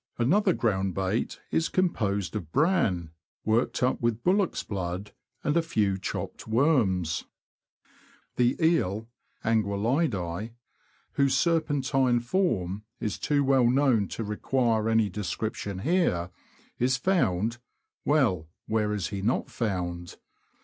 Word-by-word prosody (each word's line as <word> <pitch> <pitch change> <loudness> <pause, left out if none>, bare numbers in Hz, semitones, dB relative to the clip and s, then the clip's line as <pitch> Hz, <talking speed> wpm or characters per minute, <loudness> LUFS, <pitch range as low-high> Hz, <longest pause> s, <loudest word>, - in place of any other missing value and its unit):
Another 185 - +3
ground 95 - 0
bait 95 +4 -1
is 160 - +1
composed 105 - 0
of 80 -2 -5
bran, 130 - +1 0.3
worked 115 +3 +1
up 125 - +1
with 120 -1 0
bullock's 190 0 +1
blood 95 0 -4 0.3
and 150 - +1
a 170 - +4
few 105 - 0
chopped 95 - -5
worms. 110 - +2 1.1
The 125 0 +3
Eel 115 - +1 0.4
[Anguzllidise), 110 - 0 0.6
whose 140 -1 +2
serpentine 135 -6 +2
form 115 - 0 0.2
is 105 -3 -3
too 145 -1 +1
well 130 -3 +4
known 125 -6 +3
to 115 - -5
require 110 +1 0
any 110 -1 +3
description 100 0 -4
here, 145 - +1 0.5
is 125 +1 +2
found 120 - +1 0.2
— - - -57
well, 115 - +2 0.2
where 105 -1 0
is 100 -5 -2
he 100 -1 -4
not 115 +6 0
found? 90 -6 -3
115 Hz, 120 wpm, -27 LUFS, 100-135 Hz, 1.1 s, a